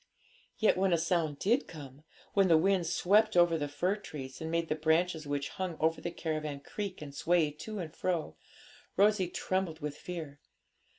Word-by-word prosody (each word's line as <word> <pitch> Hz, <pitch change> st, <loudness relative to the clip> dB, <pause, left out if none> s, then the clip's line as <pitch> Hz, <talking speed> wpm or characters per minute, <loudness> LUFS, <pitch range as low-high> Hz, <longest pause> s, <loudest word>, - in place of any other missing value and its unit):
Yet 215 Hz, -4 st, +3 dB
when 190 Hz, -1 st, +2 dB
a -, -, +4 dB
sound 165 Hz, -3 st, 0 dB
did 235 Hz, -, +1 dB
come 145 Hz, -3 st, -11 dB, 0.3 s
when 195 Hz, -2 st, +4 dB
the 165 Hz, -2 st, +6 dB
wind 185 Hz, 0 st, +2 dB
swept 210 Hz, +5 st, +3 dB
over 175 Hz, -1 st, +5 dB
the 145 Hz, -2 st, -1 dB
fir 175 Hz, +8 st, 0 dB
trees, 135 Hz, -9 st, -8 dB
and 160 Hz, -, -3 dB
made 165 Hz, 0 st, 0 dB
the -, -, +1 dB
branches 160 Hz, +1 st, +1 dB
which 145 Hz, 0 st, -2 dB
hung 185 Hz, -4 st, -4 dB
over 160 Hz, +1 st, +1 dB
the -, -, -2 dB
caravan 155 Hz, -4 st, -3 dB
creak 195 Hz, +1 st, -5 dB
and 140 Hz, -1 st, -9 dB
sway 165 Hz, 0 st, +2 dB
to 210 Hz, +9 st, -7 dB
and 165 Hz, -4 st, -6 dB
fro 170 Hz, -, -2 dB, 0.6 s
Rosalie 200 Hz, -2 st, +4 dB
trembled 185 Hz, -3 st, -2 dB
with 150 Hz, -2 st, -4 dB
fear. 160 Hz, -5 st, -7 dB
165 Hz, 180 wpm, -31 LUFS, 150-185 Hz, 0.6 s, the